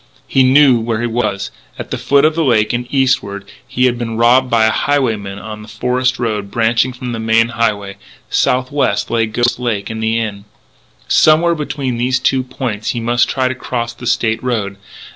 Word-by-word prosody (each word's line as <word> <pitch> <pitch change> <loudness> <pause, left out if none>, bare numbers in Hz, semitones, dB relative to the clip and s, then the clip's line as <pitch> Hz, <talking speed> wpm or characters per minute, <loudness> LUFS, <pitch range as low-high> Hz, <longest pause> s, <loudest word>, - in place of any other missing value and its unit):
He 135 - +2
knew 130 -1 +5
where 115 -1 -2
he 120 - -1
was. 110 -4 -2 0.3
At - - -8
the - - -1
foot 140 +1 +3
of 155 - +3
the 165 +1 0
lake, 115 -6 +2
and 120 +1 -2
eastward, 115 -8 0 0.2
he 125 - +1
had 120 -1 +1
been 115 -2 -4
robbed 125 +3 +4
by 115 -2 +3
a 110 - +3
highwayman 110 -10 -1
on 105 0 -8
the 105 - -12
forest 125 +3 -1
road 105 -4 -2
branching 120 +3 +1
from 125 0 -6
the 115 - -4
main 115 +1 +2
highway. 105 -4 -2 0.3
Southwest 130 -3 0
lay 115 -1 +1
Ghost 120 +3 0
Lake 115 -4 -2
and 110 0 -5
the 110 +1 0
Inn. 105 -3 -4 0.6
Somewhere 165 +2 +4
between 140 -5 -3
these 125 +2 +1
two 130 0 +1
points 125 -4 -4
he - - 0
must 120 +1 +1
try 130 -1 0
to 130 - -1
cross 120 -2 -4
the 120 +1 -8
State 110 -1 0
Road.... 105 -6 -2
120 Hz, 195 wpm, -16 LUFS, 110-130 Hz, 0.6 s, knew